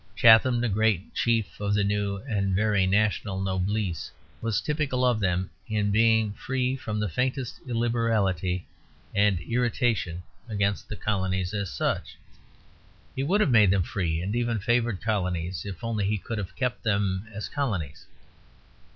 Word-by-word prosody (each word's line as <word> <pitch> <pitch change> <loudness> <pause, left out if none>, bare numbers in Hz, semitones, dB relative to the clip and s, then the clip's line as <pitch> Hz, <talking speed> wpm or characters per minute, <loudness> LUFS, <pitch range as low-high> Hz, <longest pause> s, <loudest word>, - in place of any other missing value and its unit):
Chatham, 120 +1 +6
the 120 - +1
great 105 -3 +1
chief 115 -3 0
of 105 0 0
the 105 - +2
new 100 0 0
and 100 -5 0
very 105 -2 +2
national 100 -1 +1
noblesse, 95 -1 -1 0.3
was 115 -2 0
typical 135 -1 0
of 120 -3 +3
them 90 -2 0 0.2
in 105 -2 0
being 110 -1 +3
free 130 +3 -1
from 110 -5 -4
the 105 - 0
faintest 125 - -2
illiberality 110 -7 0 0.5
and 100 -3 +3
irritation 115 -4 0 0.3
against 100 -2 -1
the 110 - -4
colonies 95 -2 -1
as 100 -4 -2
such. - - -2 1.0
He 130 - -1
would 185 +10 +2
have 150 - +3
made 105 -5 +6
them 95 -1 +3
free 85 -3 -2
and 100 +4 -2
even 120 -1 0
favoured 120 -1 0
colonies, 90 -4 -1
if 95 0 -7
only 110 -4 -1
he 105 +1 +1
could 110 +3 -5
have 100 - -6
kept 125 -1 -2
them 100 -2 0
as 105 0 -5
colonies. 95 - -3
105 Hz, 150 wpm, -27 LUFS, 95-115 Hz, 1.0 s, Chatham